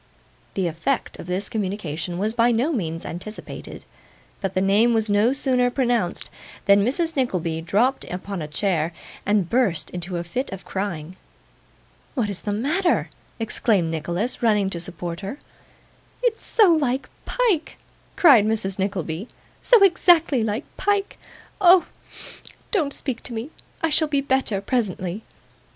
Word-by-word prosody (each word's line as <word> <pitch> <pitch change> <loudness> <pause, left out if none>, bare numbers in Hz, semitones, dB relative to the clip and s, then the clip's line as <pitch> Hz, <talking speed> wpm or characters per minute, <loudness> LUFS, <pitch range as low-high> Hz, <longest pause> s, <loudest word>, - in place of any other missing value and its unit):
The 190 - 0
effect 170 - -2
of - - -8
this 185 +2 -1
communication 185 -5 -3
was 210 +4 0
by 235 +1 +3
no 240 +7 +1
means 165 - -3
anticipated; 200 +6 -8 0.6
but 195 -2 -3
the - - +3
name 210 +5 +4
was 220 -1 0
no 210 +4 +4
sooner 255 -2 +1
pronounced, 240 -8 0 0.3
than 200 0 +5
Mrs. 320 - 0
Nickleby 180 - -1
dropped 220 +11 +1
upon 185 0 -5
a 150 - -4
chair, 165 0 0 0.3
and 205 -4 +2
burst 230 -6 +1
into 180 0 -4
a 170 - -3
fit 245 +11 -3
of 190 -1 -8
crying. 185 -3 -4 1.0
'What 220 -6 0
is 195 - -5
the 205 - -3
matter?' 300 - +1 0.3
exclaimed 215 -6 +1
Nicholas, 175 +9 -2
running 210 -4 +2
to 170 - -3
support 175 -1 -5
her. 200 +7 -6 0.9
'It's 470 -2 0
so 410 -7 +5
like 275 -4 0 0.2
Pyke,' 435 -11 0 0.4
cried 275 - +6
Mrs. 200 -3 -1
Nickleby; 190 -1 -2 0.3
'so 475 -5 +6
exactly 345 -7 +4
like 220 +5 -2
Pyke. 405 -1 0 0.4
Oh! 360 -1 +7 0.9
don't 320 -10 +1
speak 265 -4 -3
to 245 - -6
me 230 +7 -5 0.3
I 325 - +3
shall 315 +1 +3
be 285 -2 +1
better 265 -7 0
presently. 200 -4 -2
215 Hz, 145 wpm, -23 LUFS, 185-265 Hz, 1.0 s, Oh